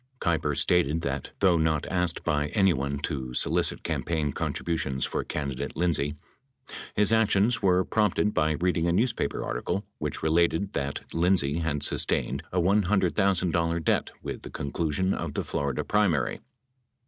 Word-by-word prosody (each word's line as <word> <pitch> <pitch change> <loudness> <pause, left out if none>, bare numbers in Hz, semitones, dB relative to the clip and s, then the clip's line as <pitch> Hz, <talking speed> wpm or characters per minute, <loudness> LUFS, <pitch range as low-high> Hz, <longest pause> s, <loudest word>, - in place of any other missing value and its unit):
Keiper 80 -4 0
stated 85 -3 +2
that 70 -2 -3
though 90 -3 +5
not 80 -2 +1
asked 90 -2 0
by 75 0 0
anyone 70 -9 +2
to 65 -5 -3
solicit - - +1
campaign 80 -4 -1
contributions 65 -6 -2
for - - -2
can 70 -2 -3
didate 65 - -5
Lindsay, 80 -4 +1 0.8
his 105 +1 +3
actions 110 +1 +3
were 95 -2 +3
prompted 105 -1 +1
by 80 -1 +2
reading 85 +1 0
a - - +2
newspaper 110 - 0
article 100 - -2
which - - -4
related 85 +4 +2
that 70 0 -2
Lindsay 85 -3 +2
had 75 -3 -1
sustained - - +1
a 90 - 0
$100,000 90 -3 +2
debt - - +1
with - - -5
the - - -9
conclusion 85 +6 -1
of - - -4
the - - -1
Florida 70 -3 -2
primary. 100 -9 +1
85 Hz, 145 wpm, -27 LUFS, 75-95 Hz, 0.8 s, though